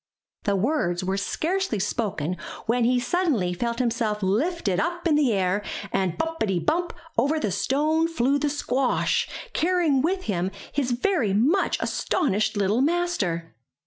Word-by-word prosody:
The 200 -2 +2
words 190 - 0
were 190 +1 0
scarcely 325 - -1
spoken 185 -5 -2 0.3
when 235 +1 +2
he 250 +1 +3
suddenly 245 - 0
felt 235 +5 -2
himself 230 -4 0
lifted 215 - +1
up 345 +1 -1
in 320 - +3
the 295 -5 +3
air, 190 0 +1 0.3
and 185 -3 0
bumpity, 225 - -1
bump, 335 - 0 0.3
over 290 +6 +2
the 210 - -1
stone 305 - +1
flew 285 -3 +1
the 295 +1 +1
squash, 270 -3 0 0.2
carrying 335 -5 +2
with 370 +5 0
him 185 -3 -1 0.2
his 275 -3 0
very 245 - +1
much 290 - +2
astonished 215 - 0
little 205 +4 +2
master! 270 - 0
245 Hz, 145 wpm, -25 LUFS, 200-320 Hz, 0.3 s, he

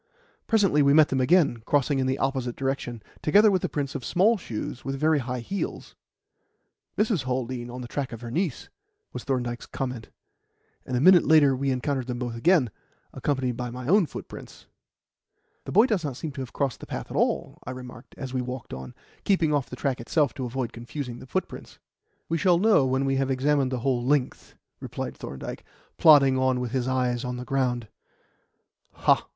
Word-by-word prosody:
Presently 195 -10 +3
we 140 0 +5
met 155 -1 +6
them 130 -1 +1
again, 140 -4 +3
crossing 140 -1 +2
in 130 - +1
the 130 +1 0
opposite 130 -3 -1
direction, 135 -4 -3 0.2
together 205 +7 +5
with 185 -2 +1
the - - -2
prints 140 -1 -3
of 140 -5 -5
small 200 - +3
shoes 125 - -6
with 135 - -3
very 155 0 +3
high 125 -1 -4
heels. 195 +11 -5 1.0
"Mrs. 210 - +1
Haldean 125 -1 -3
on 125 +1 -7
the 120 - -6
track 135 +2 -3
of 115 -1 -8
her 120 -1 -7
niece," 165 -1 -2 0.5
was - - -6
Thorndyke's 120 -3 -2
comment; 125 -4 -5 0.8
and 125 - -1
a - - +1
minute 180 +4 +7
later 150 -4 +6
we 135 +1 -1
encountered 130 0 -1
them 125 -1 -3
both 120 -2 -4
again, 140 - +3 0.4
accompanied 130 -4 -1
by 125 -1 -3
my 125 +1 -7
own 190 +1 +4
footprints. - - -10 1.0
"The - - -6
boy 215 +5 +6
does 210 -9 0
not 140 -5 -4
seem 155 - -5
to 140 -1 -6
have 130 - -7
crossed 140 -5 -2
the - - -10
path - - -6
at - - -6
all," - - 0
I - - -6
remarked 125 -1 -9
as 130 -2 -6
we 130 - 0
walked 125 0 -6
on, 65 0 -8 0.3
keeping 170 -6 +2
off 140 -3 0
the - - -6
track 130 -2 -2
itself 145 +3 +1
to 130 -2 -4
avoid 125 -1 -3
confusing 120 +1 -6
the - - -12
footprints. - - -4 0.5
"We 165 0 -1
shall 180 -1 +4
know 195 -8 +4
when 130 +1 +1
we 135 0 +1
have 135 0 0
examined 135 0 +1
the 125 -2 -2
whole 125 -2 0
length," 135 0 -1 0.2
replied - - -5
Thorndyke, 65 +1 -7 0.4
plodding 140 -4 +7
on 130 -1 +2
with 125 -2 -3
his 130 -1 -1
eyes 125 -1 0
on 125 -1 -3
the 125 - -6
ground. 125 -4 -1
130 Hz, 190 wpm, -26 LUFS, 125-150 Hz, 1.0 s, minute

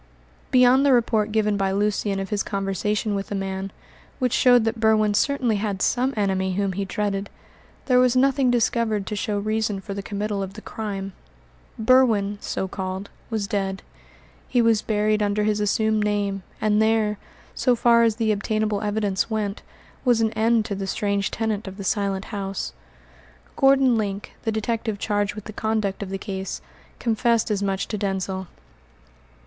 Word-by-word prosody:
Beyond 255 +1 +5
the 280 -2 +5
report 220 -3 +2
given 210 -1 +1
by 195 -1 0
Lucian 200 0 0
of 195 -1 -5
his 205 -1 +1
conversation 200 +2 -1
with 200 0 -3
the 205 - -4
man, 195 0 -3 0.5
which 250 -3 0
showed 245 -2 +5
that 225 0 -1
Berwin 215 -1 +3
certainly 245 -1 +1
had 200 -2 -2
some 255 +6 +1
enemy 190 -2 0
whom 195 0 0
he 195 +2 -2
dreaded, 200 -1 -2 0.6
there 250 -2 +4
was 250 0 +4
nothing 270 0 +3
discovered 230 -3 +1
to 210 - -4
show 210 -1 -1
reason 215 0 -1
for 200 +1 -6
the 200 - -4
committal 205 0 -3
of 195 0 -5
the 215 - -8
crime. 195 -4 -5 0.6
Berwin 220 -4 +3
so 190 - -3
called 190 +1 -5 0.2
was 220 -3 -1
dead; 195 -2 -2 0.6
he 245 - +1
was 230 -2 +4
buried 215 0 +1
under 205 0 +1
his 210 0 +1
assumed 215 +1 +1
name, 205 -2 -1 0.2
and 215 0 +2
there, 220 -1 +2 0.3
so 250 -2 +2
far 235 0 +4
as 225 -2 +3
the 225 -1 +1
obtainable 215 0 -1
evidence 205 -1 0
went, 210 -2 -2 0.4
was 245 -3 +3
an 220 -1 +2
end 225 0 +2
to 215 - -3
the 195 0 -4
strange 200 0 0
tenant 220 -2 -2
of 190 0 -8
the 200 - -6
Silent 195 -1 -1
House. 195 -1 -4 0.8
Gordon 270 -2 +4
Link, 200 -1 -4
the 225 - +1
detective 220 0 -2
charged 205 0 -1
with 215 - -7
the 215 - -8
conduct 215 -3 -1
of 200 - -4
the 195 - -3
case, 190 -1 -5 0.4
confessed 230 -1 +1
as 205 -1 0
much 195 -1 -1
to 210 - -4
Denzil. 190 -1 -2
210 Hz, 170 wpm, -23 LUFS, 200-225 Hz, 0.8 s, Beyond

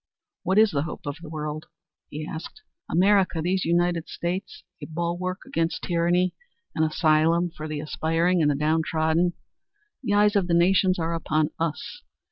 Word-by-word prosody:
What 190 - 0
is 215 -1 +6
the 140 - 0
hope 155 - -6
of 145 +1 -4
the 165 - -9
world?" 155 0 -5 0.4
he 155 +1 -5
asked. 160 - -8 0.3
"America 190 0 +3
these 180 +3 0
United 170 0 +1
States, 180 +3 -4 0.2
a - - -6
bulwark 175 +3 -3
against 165 +1 -2
tyranny, 175 +1 +1 0.4
an 160 - -1
asylum 160 +2 +2
for 155 -1 -7
the 155 -1 -4
aspiring 165 +3 +1
and 150 - +3
the 145 - +1
downtrodden. 160 +3 +1 0.7
The 205 -6 0
eyes 210 +1 +4
of 195 -3 +2
the 170 - +2
nations 185 +2 +4
are 165 0 -1
upon 155 -1 0
us. 165 - -3
170 Hz, 160 wpm, -25 LUFS, 155-180 Hz, 0.7 s, is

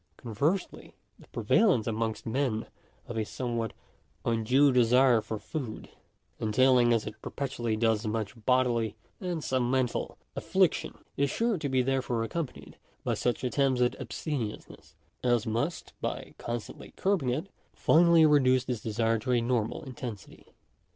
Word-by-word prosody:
Conversely, 145 - -2 0.2
the - - -17
prevalence 190 - +2
amongst 110 -1 -2
men 115 -2 -1 0.4
of 120 - -5
a 110 - +1
somewhat 115 0 -3 0.5
undue 125 +5 +3
desire 125 -1 +5
foi 110 - -5
food, 125 -1 -6 0.5
entailing 120 +2 +4
as 115 -2 +2
it 110 +1 -8
perpetually 120 -5 -3
does 110 -1 +1
much 105 -1 -2
bodily, 125 -3 +2 0.2
and 175 -4 -3
some 130 -2 0
mental, 130 -2 -1 0.2
affliction, - - +1 0.2
is 140 0 +2
sure 230 - 0
to 145 -3 -2
be 130 -1 +2
therefore 125 -3 0
accompanied 150 +4 -5 0.3
by - - 0
suck 125 +1 -1
attempts 130 0 +1
at 125 0 +2
abstemiousness, 130 -9 -5 0.3
as 120 -3 +2
must, 120 +10 -2
by - - -4
constantly 120 -1 -6
curbing 190 -10 +1
it, 155 +10 -2 0.2
finally 170 -1 +5
reduce 130 -4 +4
this 125 -4 -3
desire 115 +1 0
to 125 +4 -3
a 120 - +4
normal 115 +2 -1
intensity 125 -6 -8
•. - - -27
125 Hz, 140 wpm, -29 LUFS, 115-135 Hz, 0.5 s, desire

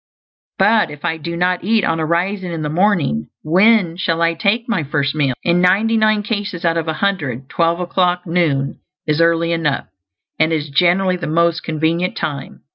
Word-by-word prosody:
But 215 +3 +3
if 150 +2 -9
I 165 -1 -1
do 170 +2 -5
not 180 +1 0
eat 220 +2 +2
on 165 - 0
arising 175 +4 -1
in 165 -2 -4
the 150 - -2
morning, 160 - 0
when 185 +1 +3
shall 165 -3 -1
I 165 0 +2
take 200 +8 0
my 230 -8 0
first 140 -1 -1
meal? 140 -4 0
In 175 +1 +2
ninety 200 +5 +3
nine 215 -1 +2
cases 205 -5 -4
out 165 0 +2
of 165 -1 -2
a 160 - 0
hundred 145 -9 -2
twelve 170 0 0
o'clock, 180 0 0
noon, 160 -6 0 0.3
is 150 +1 +1
early 170 0 +2
enough; 165 -4 -1 0.5
and 160 +1 +3
it - - +2
is 150 -1 -4
generally 180 +5 +2
the 175 - -5
most 170 +1 +1
convenient 160 +3 -1
time. 140 -3 -5
170 Hz, 190 wpm, -18 LUFS, 160-185 Hz, 0.5 s, But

